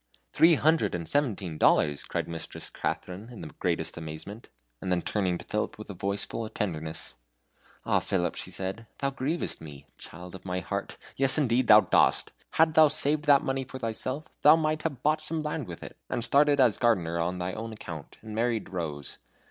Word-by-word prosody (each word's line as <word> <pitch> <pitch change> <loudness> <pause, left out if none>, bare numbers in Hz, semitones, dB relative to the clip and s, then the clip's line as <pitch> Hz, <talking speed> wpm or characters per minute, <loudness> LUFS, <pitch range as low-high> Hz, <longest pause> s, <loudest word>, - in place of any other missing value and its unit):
"Three 165 0 +6
hundred 160 - +2
and 85 -2 -4
seventeen 100 - -1
dollars!" 75 -2 +3
cried - - -3
Mistress 85 -1 -6
Katharine, 95 +5 -4
in 120 - -9
the - - -8
greatest 85 -2 -1
amazement; 85 +7 -7 0.3
and 95 - -3
then 90 -1 +1
turning 95 -4 0
to - - -11
Philip 105 - -2
with 105 -1 -8
a - - -6
voice 100 +2 -2
full 115 - -5
of 110 - -8
tenderness, 80 - -4 0.7
"Ah, - - +3
Philip," 90 -2 -1
she - - -6
said, 95 +5 -4
"thou 140 -1 -1
grievest 140 - -2
me. 75 -3 -10
Child 90 +2 -9
of 95 - -10
my 90 -1 -2
heart! 90 - -4 0.2
Yes, 135 +1 +4
indeed 130 -4 +2
thou 105 0 +9
dost. 95 - +2 0.2
Hadst 160 0 +4
thou 155 -1 +7
saved 150 0 +3
that 145 -2 +6
money 135 0 -1
for 130 +1 -8
thyself 130 +5 -3
thou 150 +2 +8
might 155 -1 0
have 140 -6 -4
bought 155 +1 +2
some 155 0 -2
land 150 -4 -3
with 85 -2 -8
it, - - -9
and 120 - -1
started 145 +1 +4
as 125 -5 +4
gardener 85 -8 +2
on 90 +2 -1
thy 90 +1 -3
own 115 +3 -5
account, 80 -8 -8
and 110 -1 -8
married 115 -1 -1
Rose. 80 -6 -5
110 Hz, 195 wpm, -28 LUFS, 90-140 Hz, 0.7 s, thou